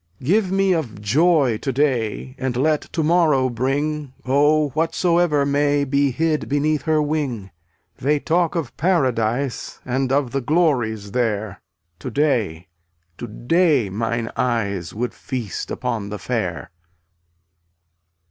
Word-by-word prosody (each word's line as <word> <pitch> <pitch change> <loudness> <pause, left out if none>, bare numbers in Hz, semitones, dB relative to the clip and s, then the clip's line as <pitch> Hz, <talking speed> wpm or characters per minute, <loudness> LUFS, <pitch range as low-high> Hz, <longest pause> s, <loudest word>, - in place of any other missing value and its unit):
267 150 +10 +2
Give 190 - -1
me 195 -1 +3
of 145 - -3
joy 135 +2 +3
to 135 - -2
day 130 -3 -1
And 130 -2 -2
let 150 +3 +2
to 160 - -1
morrow 150 -6 +3
bring, 140 +3 -2
Oh, 145 +3 +3
whatsoever 165 0 +1
may 145 0 +2
Be 140 +1 +2
hid 155 +4 -1
beneath 145 +1 +1
her 155 -1 +2
wing. 145 - -2 0.5
They 145 +3 +1
talk 170 +2 +1
of 160 -7 -3
paradise 130 -7 0
And 130 +1 -1
of 135 -3 +1
the 135 - -1
glories 120 - 0
there; 110 -4 -1 0.4
To - - -5
day, 115 - 0 0.5
to 120 - -5
day 145 - +1
mine 115 +2 -2
eyes 100 -8 -1
Would 120 +3 -3
feast 120 - -5
upon 115 -5 -3
the 105 - -5
fair. 85 - -3
135 Hz, 130 wpm, -21 LUFS, 115-155 Hz, 0.5 s, me